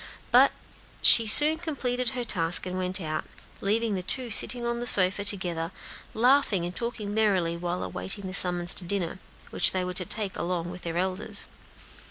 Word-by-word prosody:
But - - +4 0.5
she 230 -1 +9
soon 300 +8 +7
completed 250 -7 -2
her 245 - -3
task, 170 -7 0
and 185 0 -6
went 185 0 -2
out, 155 -3 -5 0.4
leaving 220 +2 -1
the 190 - -4
two 240 +6 -2
sitting 240 +2 +2
on 235 0 -3
the 240 - -4
sofa 195 -1 +4
together, 180 -5 -3 0.5
laughing 235 -6 +1
and 175 +1 -8
talking 225 -3 -6
merrily 195 -6 -1
while 175 +1 -5
awaiting 195 +1 -7
the 185 - -8
summons 175 -1 +1
to - - -2
dinner, 180 -1 -4 0.3
which - - +3
they 185 -1 -3
were 180 - -6
to 180 - -1
take 205 +1 -5
that - - -9
day - - -3
along 175 -1 -4
with 180 0 -11
their 170 0 -6
elders. 190 +3 -3
190 Hz, 190 wpm, -25 LUFS, 180-230 Hz, 0.5 s, she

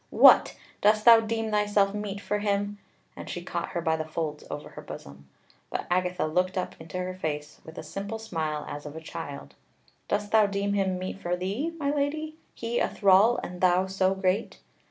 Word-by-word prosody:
"What! - - +7 0.2
dost 215 +1 +4
thou 230 -1 +10
deem 225 0 -2
thyself 205 -1 +2
meet 205 -1 -4
for 205 +1 -2
him?" 205 0 -1 0.4
And - - -8
she - - -5
caught - - -3
her 170 - -1
by 160 -1 +1
the 160 - -2
folds 155 -1 -4
over 145 - -6
her - - -10
bosom. 70 0 -10 0.4
But - - -3
Agatha 180 -2 +1
looked 180 +4 0
up 185 - -2
into 160 +2 -7
her 180 0 -3
face 150 -4 -5
with 160 - -12
a - - -5
simple 200 +7 -5
smile 160 -9 -3
as 145 +1 -6
of 145 - -9
a - - -5
child: 70 - -7 0.5
"Dost 205 0 -1
thou 220 -2 +5
deem 200 0 -1
him 190 -2 +1
meet 185 +1 -5
for 175 -1 -1
thee, 200 - -2
my 285 -3 0
Lady 305 +2 -1 0.2
he 235 +1 -2
a - - +1
thrall, 200 +4 +5
and 180 0 -7
thou 185 0 +4
so 190 0 +1
great?" 190 +2 0
190 Hz, 195 wpm, -27 LUFS, 165-210 Hz, 0.5 s, thou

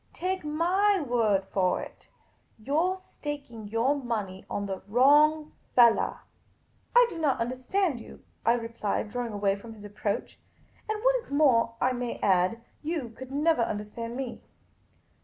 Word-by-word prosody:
Take 370 0 -2
my 365 +7 +2
word 230 - +1
for 185 -2 +1
it, - - -10 0.5
you 265 +6 -3
're 360 +4 +2
staking 285 - -7
your 230 +6 +2
money 215 -8 -4
on 200 - -2
the 195 -1 -4
wrong 295 +7 +4 0.2
fellah." 235 -2 +4 0.4
" - - -38
I - - +9
do 335 - -7
not 295 -5 +1
understand 255 +6 -1
you," - - -13 0.2
I 230 - +4
replied, 230 -3 -2
drawing 245 -2 -3
away 200 -1 +1
from 225 +3 -11
his 210 -1 -12
approach. 205 0 -4 0.2
" - - -32
And 430 0 -2
what - - +4
is 480 - -9
more, 255 -6 +3
I 255 - +2
may 245 -1 -3
add, 190 +4 +2 0.2
you 305 -6 -3
could 260 +3 -11
never 300 -1 +2
understand 230 +2 -4
me." 260 -3 -5
245 Hz, 160 wpm, -28 LUFS, 220-305 Hz, 0.5 s, I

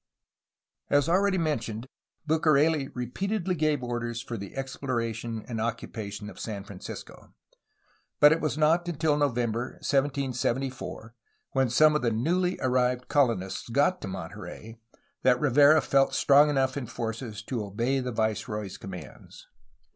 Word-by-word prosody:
As 145 -1 +3
already 190 +3 +3
mentioned, 120 -9 -2 0.4
Bucareli 155 -2 +3
repeatedly 185 - -2
gave 155 -5 0
orders 120 -1 -3
for 120 -1 -6
the 100 -3 -8
exploration 115 -4 -3
and 115 -3 -3
occupation 110 -2 -4
of - - -10
San 105 -3 -5
Francisco, 100 -2 -10 0.8
but 150 0 +8
it 165 - +2
was 155 -1 -1
not 165 +3 +3
until 160 -2 +1
November 125 -4 0
1774, 135 -4 -1 0.4
when 135 -2 +2
some 150 +5 +5
of 150 - +1
the 120 - +2
new^ly 175 +11 0
arrived 125 -1 +1
colonists 115 -9 +1
got 145 +9 +2
to - - -5
Monterey, 105 +5 -8 0.4
that 125 -1 +4
Rivera 145 +3 +6
felt 135 0 +2
strong 145 +2 +6
enough 135 -2 +1
in 135 -4 -4
forces 115 -2 -5
to 115 -1 -3
obey 115 +7 -1
the 125 -1 -3
viceroy's 105 -3 -2
commands. 90 -7 -10
125 Hz, 130 wpm, -27 LUFS, 115-145 Hz, 0.8 s, but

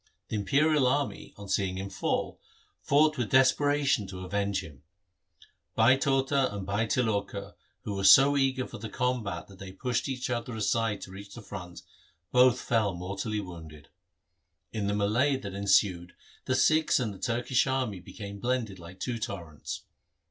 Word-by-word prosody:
The - - -3
imperial 140 +7 +3
army, 140 +1 -1
on 100 0 -9
seeing 95 -1 0
him 95 +1 -5
fall, - - -2 0.4
fought 150 0 +3
with 120 - -1
desperation 135 -3 +3
to 95 -1 -7
avenge 100 0 -1
him. 75 -6 -13 0.9
Bhai 115 +4 +6
Tota 135 -1 +1
and 100 -2 -5
Bhai 100 +3 0
Tiloka, 100 -4 -1 0.3
who 105 - -4
were 95 0 -3
so 135 +9 +8
eager 135 -2 +1
for - - -9
the 110 +1 -6
combat 115 -9 -2
that 95 -1 -15
they 95 -1 -8
pushed 125 +6 -2 0.2
others 120 -3 -3
aside 110 0 0
to 95 - -9
reach 100 +1 -10
the 120 - -9
front, 90 -4 -9 0.5
both 125 0 +5
fell 110 -5 +1
mortally 100 +4 -3
wounded. 80 -5 -11 0.8
In 105 -3 -2
the 100 - 0
melee 120 +8 +2
that 100 -7 -7
ensued 95 -3 +1 0.3
the 130 - +1
Sikhs 155 +3 +3
and 110 -5 -2
the 95 - -12
Turkish 120 +3 +1
army 130 -7 -1
became 100 +3 -9
blended 120 -5 -2
like 85 +2 -12
two 120 +1 -3
torrents. 85 -8 -6
105 Hz, 160 wpm, -29 LUFS, 95-130 Hz, 0.9 s, so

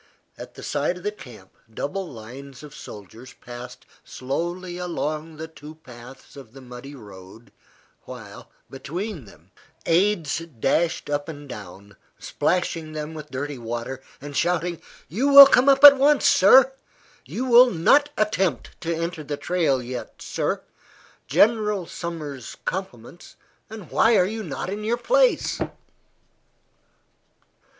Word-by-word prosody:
At - - -11
the - - -11
side 150 +5 -1
of 180 - -13
the 210 - -1
camp, 120 - -14 0.2
double 185 - -5
lines 130 +4 -11
of 150 -1 -11
soldiers 110 - -12
passed 120 0 -11 0.2
slowly 175 +7 -5
along 160 -3 -4
the 160 +1 -6
two 155 -1 -13
paths 125 -3 -14
of 130 -5 -13
the 135 - -12
muddy 125 +3 -11
road, 100 -1 -14 0.5
while, - - -11 0.2
between 165 - -6
them, 100 - -19 0.3
aides 170 -3 +1
dashed 165 +2 -1
up 145 +2 -3
and 145 -2 -9
down, 100 -3 -11 0.2
splashing 165 -3 -2
them 155 +1 -5
with 150 -1 -9
dirty 140 0 -5
water, 120 +3 -5 0.2
and 145 +1 -9
shouting, 175 +1 -1 0.3
"You 235 - -1
will 280 0 +12
come 265 0 +4
up 275 0 +4
at 285 -1 +11
once, 285 +2 +3
sir." 260 +7 +6 0.5
"You 255 - -5
will 250 0 +7
not 280 - +3
attempt 190 - -1
to 165 0 -2
enter 165 -1 -4
the 145 0 -5
trail 150 -8 0
yet, 125 0 -7
sir." - - -3 0.6
"General 210 -4 +2
Sumner's 155 -8 -7
compliments, 175 -5 -7 0.3
and 215 -6 -10
why 225 0 +4
are 180 - +4
you 220 +3 -4
not 170 -6 -5
in 210 +1 -5
your 230 +3 0
place?" - - +1
160 Hz, 135 wpm, -23 LUFS, 130-195 Hz, 0.6 s, will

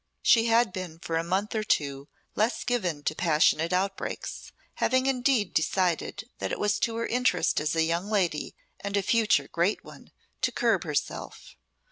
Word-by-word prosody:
She 230 -1 +5
had 230 -3 +3
been 180 -4 -6
for 165 0 -4
a 165 - +1
month 190 +5 -1
or 220 - 0
two 140 -7 -1 0.3
less 220 +4 0
given 180 -12 -1
to - - 0
passionate 160 0 +2
outbreaks, 195 +2 -3 0.3
having 260 0 +2
indeed 255 -6 +1
decided 185 +5 0
that - - -3
it - - -2
was 210 0 +1
to 230 - 0
her 230 0 -1
interest 250 +1 +1
as 155 +2 -1
a 160 - +3
young 170 +5 -1
lady 185 -8 0 0.2
and 200 0 -2
a 200 - +1
future 210 -10 +2
great 175 +5 0
one - - -14 0.3
to - - +1
curb - - +1
herself. - - -4
195 Hz, 170 wpm, -27 LUFS, 165-225 Hz, 0.3 s, She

